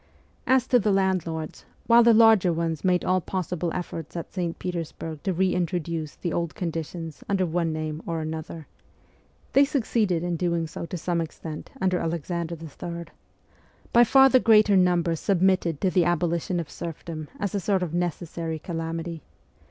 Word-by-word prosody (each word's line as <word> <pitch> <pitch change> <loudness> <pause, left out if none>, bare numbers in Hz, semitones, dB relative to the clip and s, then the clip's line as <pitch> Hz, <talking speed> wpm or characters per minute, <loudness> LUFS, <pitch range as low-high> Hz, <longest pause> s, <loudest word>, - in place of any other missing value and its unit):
As 260 -2 +4
to 250 -1 +4
the 210 -1 +1
landlords, 180 -5 -1 0.2
while 235 0 +7
the 235 0 +6
larger 220 -5 +6
ones 165 -2 -2
made 180 -1 +2
all 185 0 +2
possible 180 -2 -3
efforts 165 -3 -5
at 170 - -6
St. 175 -3 -2
Petersburg 165 -3 -5
to 190 - -1
re 185 +1 +1
introduce 170 -3 -2
the 170 - -3
old 170 -2 -2
conditions 165 -3 -5
under 195 -2 +2
one 170 -1 0
name 155 0 -4
or 165 -1 -2
another 160 0 -5 0.9
(they 275 - +7
succeeded 220 - 0
in 175 -1 -1
doing 170 -1 0
so 165 +1 -6
to 180 - -5
some 170 0 -1
extent 155 -1 -7
under 185 -3 +1
Alexander 170 +1 -3
III.), 170 +2 -7 0.9
by 240 - +8
far 270 +3 +6
the 260 -1 +5
greater 215 -3 +5
number 175 -2 +3
submitted 185 -3 +1
to 185 - +2
the 180 -3 +3
abolition 175 +1 0
of 165 - -4
serfdom 160 -1 -6
as 200 -2 -1
to - - -1
a - - 0
sort 190 0 +1
of 170 -3 -4
necessary 170 -1 -3
calamity. 165 0 -4
170 Hz, 165 wpm, -25 LUFS, 165-185 Hz, 0.9 s, by